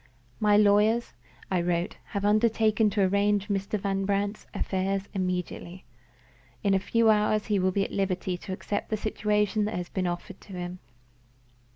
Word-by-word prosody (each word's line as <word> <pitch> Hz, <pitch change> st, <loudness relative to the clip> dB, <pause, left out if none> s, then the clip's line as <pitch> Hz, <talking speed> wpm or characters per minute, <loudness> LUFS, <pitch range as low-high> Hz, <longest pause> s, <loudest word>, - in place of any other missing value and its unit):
"My 210 Hz, -1 st, +4 dB
lawyers" 210 Hz, +3 st, +3 dB, 0.4 s
(I 180 Hz, -2 st, +2 dB
wrote) 175 Hz, +1 st, -1 dB
"have 200 Hz, -1 st, -3 dB
undertaken 215 Hz, 0 st, +3 dB
to 200 Hz, 0 st, +1 dB
arrange 200 Hz, +2 st, +2 dB
Mr. 200 Hz, +1 st, -1 dB
Van 195 Hz, 0 st, -1 dB
Brandt's 200 Hz, +1 st, -1 dB
affairs 195 Hz, +1 st, -1 dB
immediately. 180 Hz, -1 st, -3 dB, 0.8 s
In 200 Hz, -, +3 dB
a 195 Hz, -, +4 dB
few 225 Hz, +3 st, +3 dB
hours 210 Hz, 0 st, +2 dB
he 210 Hz, -2 st, +1 dB
will 185 Hz, 0 st, +2 dB
be 195 Hz, +1 st, +1 dB
at -, -, -5 dB
liberty 185 Hz, -2 st, -1 dB
to 185 Hz, +2 st, -8 dB
accept 205 Hz, +2 st, -3 dB
the 215 Hz, -, 0 dB
situation 210 Hz, 0 st, 0 dB
that 215 Hz, -, -3 dB
has 180 Hz, 0 st, -4 dB
been 185 Hz, -2 st, -1 dB
offered 175 Hz, +2 st, -5 dB
to 195 Hz, -, -12 dB
him." 180 Hz, 0 st, -5 dB
200 Hz, 165 wpm, -27 LUFS, 185-210 Hz, 0.8 s, My